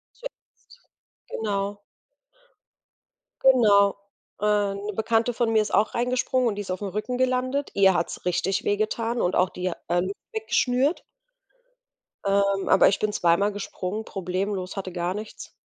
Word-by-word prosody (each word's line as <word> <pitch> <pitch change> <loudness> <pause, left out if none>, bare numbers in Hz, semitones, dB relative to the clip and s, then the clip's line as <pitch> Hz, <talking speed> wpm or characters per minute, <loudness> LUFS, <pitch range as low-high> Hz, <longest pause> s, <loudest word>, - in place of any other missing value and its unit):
Zuerst, - - -13 0.5
genau. 205 -1 -3 1.6
Genau. 210 -7 +5 0.4
Äh, 205 -1 +1
'ne 205 +1 -5
Bekannte 225 +2 +1
von 235 -1 0
mir 220 - +4
ist - - -5
auch 210 +3 +2
reingesprungen 250 0 +1
und 210 - -1
die 205 - -3
ist 190 - -8
aufm 195 +2 -3
Rücken 215 +6 -3
gelandet. 255 +2 0
Ihr 195 -2 +5
hat's 170 - -3
richtig 180 +2 0
wehgetan 225 +3 -1
und 180 - +1
auch 185 - +2
die, 180 0 -5 0.2
äh, 175 +1 +2
Lunge 185 +2 -2 0.2
weggeschnürt. 285 - +1 1.2
Ähm, 200 0 +1
aber 190 - +6
ich 200 - +1
bin 215 -1 -1
zwei 170 -3 +3
mal 205 +1 +2
gesprungen, 205 +1 -5
problemlos, 190 0 -3
hatte 185 -2 -5
gar 175 +1 -2
nichts. 215 +1 -8
205 Hz, 145 wpm, -25 LUFS, 195-230 Hz, 1.6 s, aber